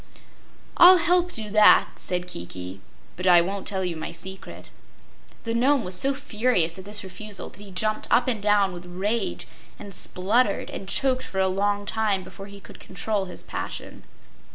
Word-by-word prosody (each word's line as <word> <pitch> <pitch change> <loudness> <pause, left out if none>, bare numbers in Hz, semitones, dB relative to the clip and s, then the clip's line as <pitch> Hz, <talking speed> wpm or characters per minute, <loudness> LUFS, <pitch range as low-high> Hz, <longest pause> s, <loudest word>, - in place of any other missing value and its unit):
"I'll 365 +1 +9
help 355 +1 +2
do 215 -2 -5
that," 215 0 +6
said 180 -1 -2
Kiki, 90 - -7 0.3
"but 180 +1 -3
I 175 -1 +8
won't 195 +3 -4
tell 190 -2 -2
you 175 -2 -2
my 160 +1 -6
secret." 190 +3 -10 0.7
The 230 - -2
Nome 255 +2 +2
was 180 - -4
so 275 +8 +1
furious 210 - 0
at 190 - -10
this 205 +1 -1
refusal 200 +2 -7
that - - -18
he 205 - -11
jumped 215 +3 -1
up 240 +2 +3
and 230 -5 -1
down 205 -2 +2
with 175 0 -9
rage 200 +6 -2 0.3
and 200 - -10
spluttered 200 +5 0
and 190 - -7
choked 260 +2 +2
for 190 - -8
a 190 0 +3
long 205 +2 0
time 205 -3 0
before 195 +2 -11
he 200 0 -12
could - - -14
control 200 +1 -3
his 180 -2 -5
passion. - - -6
200 Hz, 175 wpm, -24 LUFS, 185-220 Hz, 0.7 s, I'll